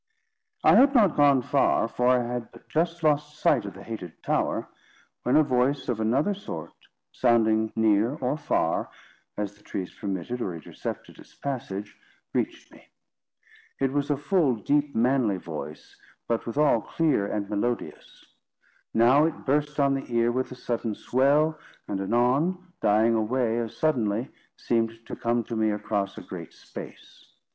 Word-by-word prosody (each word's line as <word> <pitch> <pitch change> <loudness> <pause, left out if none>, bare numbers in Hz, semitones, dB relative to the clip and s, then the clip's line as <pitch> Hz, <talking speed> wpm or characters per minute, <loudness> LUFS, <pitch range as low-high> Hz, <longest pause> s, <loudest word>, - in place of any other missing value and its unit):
I - - +7
had 275 +1 +6
not 205 -9 +5
gone 140 -3 +5
far, 135 -3 +2
for 125 +2 0
I 125 -1 +4
had 120 -1 -4
but - - -17
just 165 +1 -1
lost 150 0 +1
sight 125 -8 +3
of 100 - -7
the 100 - -10
hated 100 -8 -8
tower, - - 0 0.5
when 125 - +1
a 155 - +7
voice 135 0 +1
of 115 -3 -1
another 130 - +2
sort, 200 - -7 0.4
sounding 110 -3 +2
near 110 +3 +3
or 130 -2 -1
far, 155 - 0 0.5
as 105 -1 -3
the 105 - -24
trees 95 -3 -5
permitted 100 +5 -4
or 90 -6 -2
intercepted 80 - -7
its - - -16
passage, 105 -7 -5 0.4
reached - - -2
me. - - -18 0.9
It 135 -1 +1
was 145 0 0
a 145 - +1
full, 145 -3 +2
deep, 145 +6 0
manly 120 -4 +2
voice, - - -8 0.3
but 115 0 -1
withal 115 -1 +3
clear 150 -11 0
and 100 -1 -2
melodious. 110 +4 -4 0.7
Now 125 +7 +5
it 165 - -3
burst 150 +2 0
on 140 -1 +4
the 135 -2 -4
ear 115 0 +2
with 130 +2 -2
a - - -6
sudden 115 -3 -3
swell, 145 +7 +2 0.3
and 95 -1 -2
anon, 145 - +1
dying 110 +2 +4
away 115 +1 +1
as 115 -2 -5
suddenly, 120 -6 0 0.3
seemed 115 -1 -1
to - - -6
come 120 0 0
to 115 - -5
me 110 -1 +2
across 105 -1 -2
a - - -6
great - - -9
space. - - -11
125 Hz, 160 wpm, -26 LUFS, 110-145 Hz, 0.9 s, I